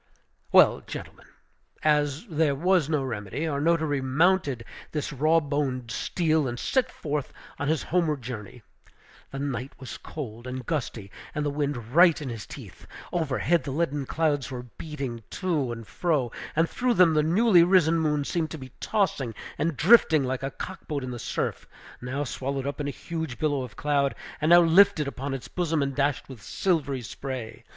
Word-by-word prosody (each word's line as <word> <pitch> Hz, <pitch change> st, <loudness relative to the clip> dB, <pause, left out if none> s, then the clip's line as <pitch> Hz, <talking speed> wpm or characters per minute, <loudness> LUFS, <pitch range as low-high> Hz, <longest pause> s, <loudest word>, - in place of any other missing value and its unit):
Well, -, -, +6 dB
gentlemen, -, -, -8 dB, 0.6 s
as 150 Hz, -, +2 dB
there 155 Hz, -7 st, +1 dB
was 175 Hz, 0 st, +2 dB
no 150 Hz, -3 st, +1 dB
remedy, 115 Hz, -, -3 dB
our 145 Hz, -3 st, -1 dB
notary 160 Hz, -3 st, +2 dB
mounted 140 Hz, -2 st, +2 dB, 0.3 s
this 150 Hz, -1 st, -3 dB
raw 155 Hz, +4 st, +4 dB
boned 140 Hz, -5 st, -2 dB
steed 160 Hz, -, 0 dB
and 120 Hz, 0 st, -4 dB
set 260 Hz, -, 0 dB
forth 150 Hz, -2 st, -3 dB, 0.2 s
upon 145 Hz, -, -4 dB
his 155 Hz, -1 st, +1 dB
homeward 160 Hz, -6 st, 0 dB
journey. 115 Hz, -1 st, -7 dB, 0.7 s
The 135 Hz, -, -7 dB
night 135 Hz, -2 st, -3 dB
was 130 Hz, -, -8 dB
cold 120 Hz, -5 st, -7 dB
and 125 Hz, 0 st, -5 dB
gusty, 115 Hz, -10 st, -3 dB, 0.2 s
and 150 Hz, -1 st, -1 dB
the 145 Hz, -, 0 dB
wind 140 Hz, -5 st, -3 dB
right 170 Hz, 0 st, +6 dB
in 145 Hz, -4 st, -5 dB
his 115 Hz, -3 st, -6 dB
teeth. -, -, -11 dB, 0.3 s
Overhead 160 Hz, +1 st, +1 dB
the -, -, -5 dB
leaden 145 Hz, -2 st, -1 dB
clouds 150 Hz, -4 st, 0 dB
were 125 Hz, -2 st, -5 dB
beating 130 Hz, -2 st, -6 dB
to 160 Hz, -10 st, -1 dB
and 115 Hz, -1 st, -6 dB
fro, 145 Hz, -3 st, 0 dB, 0.2 s
and 165 Hz, +2 st, +3 dB
through 245 Hz, +4 st, 0 dB
them 175 Hz, -3 st, +6 dB
the 155 Hz, -, +4 dB
newly 180 Hz, +4 st, +5 dB
risen 170 Hz, -2 st, +4 dB
moon 150 Hz, -2 st, +1 dB
seemed 160 Hz, 0 st, -1 dB
to 160 Hz, -, -6 dB
be 130 Hz, -3 st, -10 dB
tossing 145 Hz, -, 0 dB, 0.2 s
and 160 Hz, -3 st, 0 dB
drifting 165 Hz, -5 st, +6 dB
along 130 Hz, -, -2 dB
like 130 Hz, -1 st, -2 dB
a 135 Hz, -, -2 dB
cock 185 Hz, +6 st, -8 dB
boat 145 Hz, -4 st, -2 dB
in 130 Hz, -, -4 dB
the 120 Hz, -, -6 dB
surf; -, -, -3 dB, 0.3 s
now 130 Hz, +4 st, -2 dB
swallowed 135 Hz, 0 st, -3 dB
up 140 Hz, +1 st, -3 dB
in 145 Hz, -, -2 dB
a -, -, 0 dB
huge 160 Hz, -3 st, -5 dB
billow 145 Hz, -3 st, 0 dB
of 125 Hz, -4 st, -7 dB
cloud, 140 Hz, -2 st, +1 dB, 0.3 s
and 155 Hz, -, +2 dB
now 175 Hz, 0 st, +9 dB
lifted 170 Hz, -2 st, +5 dB
upon 140 Hz, 0 st, -4 dB
its 130 Hz, -, -7 dB
bosom 165 Hz, -4 st, 0 dB
and 140 Hz, 0 st, -2 dB
dashed 145 Hz, -1 st, 0 dB
with 130 Hz, -5 st, -10 dB
silvery 145 Hz, -9 st, -1 dB
spray. 120 Hz, -1 st, -6 dB
145 Hz, 180 wpm, -26 LUFS, 130-165 Hz, 0.7 s, now